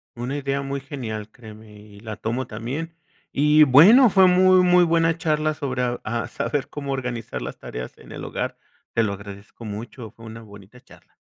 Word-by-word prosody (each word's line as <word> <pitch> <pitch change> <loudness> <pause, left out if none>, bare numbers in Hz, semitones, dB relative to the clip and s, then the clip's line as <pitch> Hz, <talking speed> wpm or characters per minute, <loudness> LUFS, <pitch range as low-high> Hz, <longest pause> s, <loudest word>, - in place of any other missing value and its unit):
Una 125 +4 -4
idea 140 0 -2
muy 140 0 -4
genial, 115 -6 -6
créeme. 110 -2 -14
Y 105 0 -16
y - - -13
la 110 -1 -6
tomo 120 +3 -3
también. 135 +10 -6 0.4
Y 150 +2 +5
bueno, 190 - +7
fue 190 -1 +6
muy, 185 0 +5
muy 180 0 +5
buena 165 -1 +2
charla 155 -1 0
sobre 130 -4 -3 0.2
a 115 +1 -3
saber 130 +3 -3
cómo 140 -1 -5
organizar 125 -4 -4
las - - -6
tareas 60 0 -8
en - - -15
el - - -8
hogar. - - -4 0.4
Te - - +2
lo 105 -2 -1
agradezco 100 +3 -11
mucho. 110 +2 -8
Fue 115 - -15
una 115 0 -9
bonita 100 +2 -15
charla. - - -21
130 Hz, 185 wpm, -23 LUFS, 110-155 Hz, 0.4 s, bueno